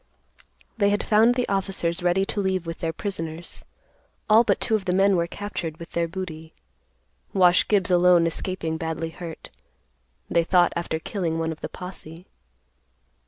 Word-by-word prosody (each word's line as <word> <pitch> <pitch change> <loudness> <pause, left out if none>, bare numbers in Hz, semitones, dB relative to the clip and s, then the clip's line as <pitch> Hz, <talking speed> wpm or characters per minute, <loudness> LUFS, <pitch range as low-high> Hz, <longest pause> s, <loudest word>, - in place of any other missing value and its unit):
They 200 -1 +4
had 205 0 0
found 225 +3 +4
the 250 -1 0
officers 190 -3 -1
ready 180 +2 +2
to 205 - -3
leave 190 -2 -1
with 165 0 -6
their 165 - -1
prisoners. 165 -2 -5 0.7
All 220 +2 +7
but - - +1
two - - -1
of 210 -3 +1
the 180 -1 +1
men 195 +1 +4
were 170 -1 +1
captured 170 -5 -5
with 170 - -10
their 170 0 0
booty—Wash 160 - -2
Gibbs 195 -3 +2
alone 175 -1 +5
escaping 165 -1 -3
badly 160 0 -3
hurt, 165 -1 -9 0.8
they 170 0 +2
thought, 175 +1 +3
after 170 -1 -2
killing 165 -1 -3
one 165 0 -1
of 160 - -8
the - - -4
posse. 180 -2 -9
175 Hz, 160 wpm, -24 LUFS, 165-195 Hz, 0.8 s, All